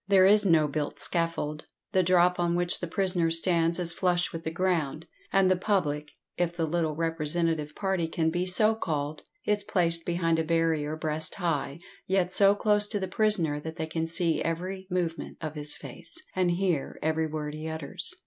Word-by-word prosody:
There 195 -2 +5
is 205 +1 +5
no 160 -3 +4
built 145 0 -3
scaffold; 165 -3 -1 0.2
the 190 -2 +3
drop 180 0 +3
on 175 0 +1
which 175 0 +2
the 175 - -4
prisoner 180 -1 +2
stands 165 0 +3
is 175 -2 -1
flush 175 -1 0
with 165 0 -6
the 160 - -2
ground, 165 -3 -1 0.3
and 195 -1 +4
the 185 - +4
public 170 -7 -1 0.3
(if 175 -1 0
the 165 -2 0
little 160 -1 -1
representative 165 -1 -1
party 190 -4 -1
can 160 0 0
be 180 +2 -1
so 215 +4 +5
called) 155 -7 -3 0.2
is 210 -1 0
placed 170 -5 +1
behind 165 -1 0
a - - +1
barrier 160 -2 0
breast 155 0 -1
high, 160 -6 -2 0.3
yet 185 -1 +1
so 200 +1 +6
close 210 0 +2
to 205 -1 -2
the 190 - -3
prisoner 180 -10 +1
that 160 +2 -7
they 160 - -3
can 160 +1 -3
see 165 0 +1
every 185 +3 -3
movement 175 -2 -3
of 155 -2 -5
his 150 -1 -5
face, - - -10 0.2
and 185 -1 +2
hear 175 -5 -1
every 160 +1 0
word 150 -1 -5
he 155 +1 -6
utters. 160 -3 -3
170 Hz, 185 wpm, -28 LUFS, 160-185 Hz, 0.3 s, so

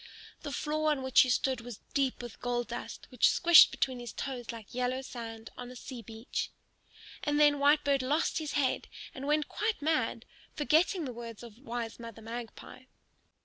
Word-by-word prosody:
The 290 - -5
floor 310 +2 0
on 285 -3 0
which 260 0 +6
he 255 - +2
stood 260 0 +1
was 235 -3 -8
deep 270 -3 0
with 240 -2 -9
gold 240 -1 -1
dust, 240 +1 -6
which 250 - +4
squished 345 -2 +8
between 255 -2 -1
his 240 -3 -7
toes 250 -4 -4
like 225 -3 -10
yellow 250 +1 -1
sand 225 -3 -8
on 245 0 -7
a 250 - -10
sea 250 0 -8
beach. 225 +2 -4 0.7
And 295 0 +1
then 295 -1 +5
Whitebird 285 -1 +4
lost 295 +5 +1
his 310 -2 -4
head 275 -3 +1 0.3
and 270 +1 -6
went 300 0 +2
quite 435 0 -1
mad, 310 +2 0 0.3
forgetting 320 +3 +2
the 255 - -5
words 230 -1 -8
of 230 -1 -12
wise 235 -3 -5
Mother 230 -1 -9
Magpie. 235 +2 -8
255 Hz, 180 wpm, -31 LUFS, 235-290 Hz, 0.7 s, squished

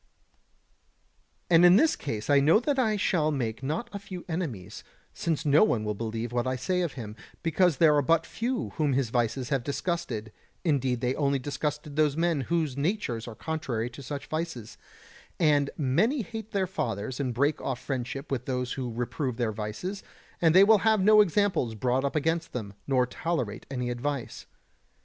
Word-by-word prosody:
122. 175 - +5
And 165 - +7
in 175 +1 +8
this 320 +7 +4
case 110 -7 -5
I 145 -1 +5
know 155 +9 +5
that 275 +2 0
I 220 -4 +2
shall 165 -5 +1
make 120 -6 -2
not 155 - -2
a 200 - -4
few 190 -3 -8
enemies, 130 - -4 0.3
since 165 -1 -2
no 145 +4 +6
one 120 - +1
will 105 0 -1
believe 115 +2 -4
what 120 +1 -1
I 130 - 0
say 180 +8 -1
of 170 -5 -2
him; 110 -4 -7 0.3
because 165 -1 +2
there 155 -3 +5
are 145 - +4
but 165 +4 +2
few 245 +2 -3
whom 150 -4 +2
his 130 -3 0
vices 120 +2 0
have 135 -4 0
disgusted, 135 - -3 0.3
indeed 130 -6 +1
they 125 +1 +1
only 140 -1 +1
disgusted 145 +2 -4
those 150 -1 +2
men 165 -3 +1
whose 155 -1 -1
natures 140 - -2
are 115 - -7
contrary 125 -7 -3
to 130 - -10
such 140 +2 -6
vices; 155 -9 -4 0.6
and 145 -3 +3
many 215 - +1
hate 225 0 -7
their 195 -3 0
fathers 120 - -3
and 130 -3 -1
break 140 +4 +1
off 130 -2 -3
friendship 135 +2 -4
with 125 -2 -2
those 125 -1 -2
who 125 -3 -4
reprove 120 +2 -3
their 120 -3 0
vices, 110 - -5 0.4
and 165 -1 +4
they 190 - +9
will 215 +1 +6
have 220 0 +3
no 215 +2 +7
examples 190 - +1
brought 125 +4 0
up 140 - -2
against 160 +2 0
them, 105 -5 -5
nor 130 -2 +3
tolerate 125 -5 -3
any 125 -2 -2
advice. 130 +1 -4
140 Hz, 185 wpm, -28 LUFS, 125-170 Hz, 0.6 s, they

